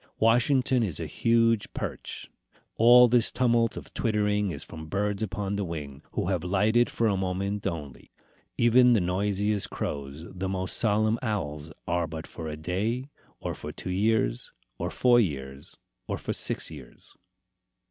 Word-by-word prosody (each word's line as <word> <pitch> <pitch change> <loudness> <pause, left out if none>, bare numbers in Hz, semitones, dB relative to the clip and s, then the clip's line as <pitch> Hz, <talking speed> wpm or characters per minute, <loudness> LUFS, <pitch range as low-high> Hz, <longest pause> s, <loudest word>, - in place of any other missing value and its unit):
Washington 125 +3 +3
is 95 -10 -2
a - - -3
huge 115 -2 +2
perch. - - -5 0.5
All 120 +2 +8
this 120 -1 +3
tumult 120 -2 +2
of - - -9
twittering 105 -2 +1
is 75 -5 -5
from 80 -1 -9
birds 100 +3 -1
upon 100 -1 -2
the 100 - -1
wing, 75 -5 -6
who 85 - -1
have 90 -4 0
lighted 105 +6 +2
for 115 - -1
a 100 - +2
moment 95 +2 -2
only. 75 -8 -6 0.5
Even 125 +1 +6
the 115 - +4
noisiest 100 +3 0
crows, 70 +3 -5
the 95 +1 -4
most 95 -1 -3
solemn 110 +1 +2
owls, 75 - -3 0.2
are 85 -1 0
but 80 +1 -7
for 80 - -8
a 75 0 -5
day, 110 - -2 0.3
or - - -3
for - - -7
two 90 - -6
years, 100 - 0 0.3
or - - -2
four 120 -1 +4
years, 70 - -3 0.3
or - - -2
for - - -4
six - - 0
years. - - -12
100 Hz, 160 wpm, -27 LUFS, 85-115 Hz, 0.5 s, All